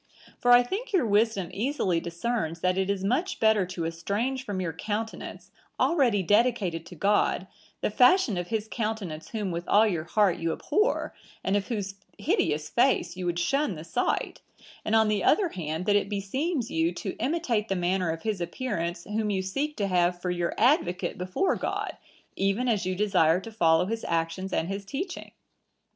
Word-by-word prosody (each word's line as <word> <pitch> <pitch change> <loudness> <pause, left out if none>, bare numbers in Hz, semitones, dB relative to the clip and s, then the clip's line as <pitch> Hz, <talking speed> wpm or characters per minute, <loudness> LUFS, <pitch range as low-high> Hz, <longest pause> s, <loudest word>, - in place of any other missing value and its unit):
For 245 - +1
I 245 0 +8
think 425 - -5
your 355 -9 +3
wisdom 205 -3 +2
easily 210 - 0
discerns 170 0 -3
that 185 0 +2
it 190 0 0
is 200 -1 -1
much 285 - 0
better 220 -4 +3
to 175 -2 -4
estrange 205 +11 -2
from 205 -7 -4
your 170 -3 -2
countenance, 215 +6 -5 0.3
already 245 - +3
dedicated 205 -5 +1
to 180 - -10
God, 200 +1 +2 0.4
the - - 0
fashion 250 - +5
of 175 0 -3
his 220 -1 -2
countenance 210 -9 -4
whom 210 -5 -3
with 170 +1 -4
all 215 +2 +5
your 170 -7 -1
heart 200 0 +2
you 165 0 -1
abhor, 425 +4 0 0.3
and 190 - +1
of 200 -1 0
whose 205 -4 -3 0.2
hideous 300 - 0
face 255 -3 +2
you 180 -1 -4
would 175 0 -1
shun 275 +4 +1
the 155 - -8
sight; 165 +9 -1 0.4
and, 220 - +1
on 220 -1 +5
the 210 -1 0
other 395 -5 +3
hand, 160 - -4
that 205 -1 +3
it 200 -1 +1
beseems 245 - -2
you 165 +1 +1
to 190 +1 -4
imitate 255 -8 0
the 195 - -1
manner 180 0 0
of 165 0 -4
his 215 -5 -2
appearance, 175 -3 -3
whom 210 +1 -2
you 190 -2 0
seek 280 +11 -2
to 205 - 0
have 180 -2 +1
for 180 0 -2
your 175 -1 -1
advocate 220 - +2
before 185 - 0
God, - - -3 0.4
even 195 +6 0
as 210 -6 +1
you 185 - -1
desire 180 -4 +3
to 225 +4 -9
follow 165 -5 +3
his 225 +3 -3
actions 165 +3 -1
and 165 - 0
his 195 +1 -4
teaching. 355 - -5
200 Hz, 185 wpm, -27 LUFS, 175-235 Hz, 0.4 s, I